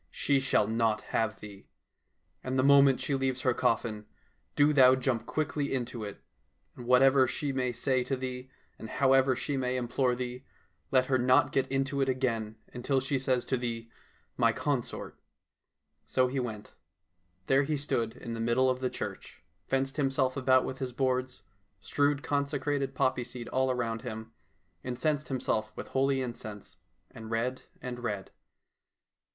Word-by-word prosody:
She 140 -1 +1
shall 130 -5 +2
not 110 -1 +1
have 110 -1 0
thee. 100 -2 -11 0.8
And 130 +1 -2
the 130 - +3
moment 140 -1 +6
she 145 - -2
leaves 135 -1 0
her 130 -1 +2
coffin, 110 -3 -1 0.5
do 145 +1 +4
thou 130 -2 +7
jump 130 -3 -1
quickly 150 -2 -1
into 120 -3 -3
it. 100 -1 -8 0.5
And 120 - -9
whatever 130 +1 +5
she 140 +3 -2
may 130 -2 -1
say 125 +2 0
to 135 - -1
thee, 130 0 -5 0.3
and 110 - -8
however 135 0 +3
she 135 +3 -2
may 130 -1 -1
implore 125 +1 0
thee, 125 +1 -5 0.5
let 130 -1 +3
her 130 -1 +1
not 130 +2 +4
get 135 -1 +1
into 135 +1 0
it 135 - +1
again 115 -4 -1 0.2
until 130 +2 0
she 135 +1 -1
says 130 -1 0
to 130 - 0
thee, 115 -1 -4 0.2
' - - -37
My - - +6
consort - - -3 0.2
.' - - -60
' - - -59
" - - -48
So 130 -1 +3
he 135 +2 -2
went. 110 -4 -5 0.7
There 135 +5 +4
he 150 +1 -1
stood 120 -5 -1
in 115 - -6
the 115 - -5
middle 120 +3 +2
of 130 - -3
the 130 -1 -1
church, - - -7 0.2
fenced 135 +1 -1
himself 135 -2 +1
about 130 -1 +3
with 130 - -5
his 130 -2 -3
boards, 130 0 -1 0.4
strewed 145 0 0
consecrated 140 -1 -1
poppy 130 -1 +1
seed 120 0 -7
around 125 -3 0
him, 110 -3 -7 0.5
incensed 145 +4 -1
himself 110 -5 -1
with - - -7
holy 135 0 +1
incense, 110 -4 -8 0.3
and 110 -1 -10
read 120 +3 -1 0.2
and 125 -1 -5
read. 105 -5 -4
130 Hz, 170 wpm, -30 LUFS, 120-135 Hz, 0.8 s, thou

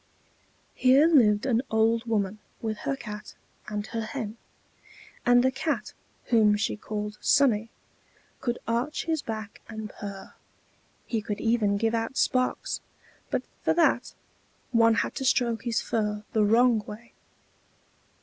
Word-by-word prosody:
Here 260 +4 +5
lived 230 -10 +4
an 240 -3 +2
old 225 +1 +2
woman, 210 -2 -1 0.2
with 220 -1 -2
her 275 - +1
Cat 210 -5 -8 0.3
and 210 -1 -3
her 225 +1 -4
Hen. 220 -2 -5 0.9
And 245 0 +6
the 260 - +3
Cat, 280 +3 -2 0.4
whom 215 -3 +5
she 215 - -1
called 210 0 -5
Sonnie, 230 -6 +3 0.7
could 240 -2 -2
arch 235 +6 -1
his 320 -2 0
back 215 -3 -6
and 220 -1 -6
purr; 200 -2 -8 0.7
he 225 -2 -2
could 205 0 -4
even 225 -3 +2
give 225 +2 0
out 225 +3 -2
sparks 255 0 0 0.5
but - - -1 0.2
for - - +1
that, 340 - +2 0.6
one 230 -1 +5
had - - 0
to - - -3
stroke 240 -4 +1
his 235 -1 0
fur 210 -1 -2
the 220 - +3
wrong 230 +2 +4
way. 235 +3 -10
225 Hz, 140 wpm, -27 LUFS, 210-245 Hz, 0.9 s, And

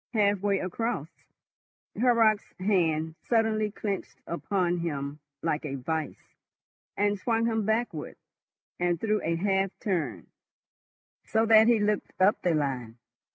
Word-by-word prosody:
Halfway 205 -2 +2
across, 185 -3 -2 0.9
Horrocks' 225 -3 +3
hand 165 -5 +1
suddenly 220 -2 +1
clenched 200 -1 -5
upon 175 0 -1
him 145 -3 -3 0.2
like 160 -2 0
a 140 -3 -4
vice, 155 +4 -5 0.6
and 205 0 +1
swung 230 +2 +1
him 225 -2 0
backward 220 -8 -1 0.6
and 175 -1 +1
through 215 +1 0
a 165 +1 0
half 195 +2 +1
turn, 150 - -2 1.0
so 220 +1 +1
that 220 0 +7
he 235 -2 +5
looked 210 0 0
up 190 +3 +4
the 175 -3 +2
line. 130 -6 -2
195 Hz, 120 wpm, -28 LUFS, 160-215 Hz, 1.0 s, that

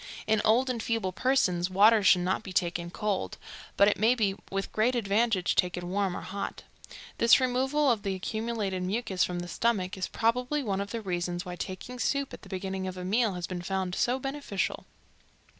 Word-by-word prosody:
In 220 -1 +2
old 235 +4 +4
and 245 -3 -2
feeble 225 -4 -1
persons 185 -6 +1
water 210 +4 +6
should 185 -2 +5
not 185 +3 0
be 195 - -9
taken 175 -2 -1
cold, 205 +1 -2 0.4
but 200 - +6
it 205 - +2
may 225 +4 +4
be 205 -5 +1
with 195 0 -3
great 235 +4 +2
advantage 210 -3 +1
taken 180 0 0
warm 195 -2 0
or - - -6
hot. 200 +1 -5 0.6
This 235 +3 +6
removal 265 +3 +2
of 225 -3 0
the 195 -2 -2
accumulated 215 -1 -3
mucus 190 0 0
from 175 -1 -2
the 175 - -6
stomach 190 -1 0
is 190 -2 -3
probably 250 +6 0
one 200 -4 -1
of 200 - -5
the 230 +1 -4
reasons 175 -2 -3
why 180 -1 -5
taking 195 +8 -6
soup 280 +3 0
at - - -9
the - - -14
beginning 190 0 -3
of 185 0 -6
a 180 - -5
meal 215 +1 +1
has 175 -1 -3
been 180 0 -5
found 190 0 -2
so 245 +6 +1
beneficial. 270 -7 -3
200 Hz, 195 wpm, -29 LUFS, 185-235 Hz, 0.6 s, water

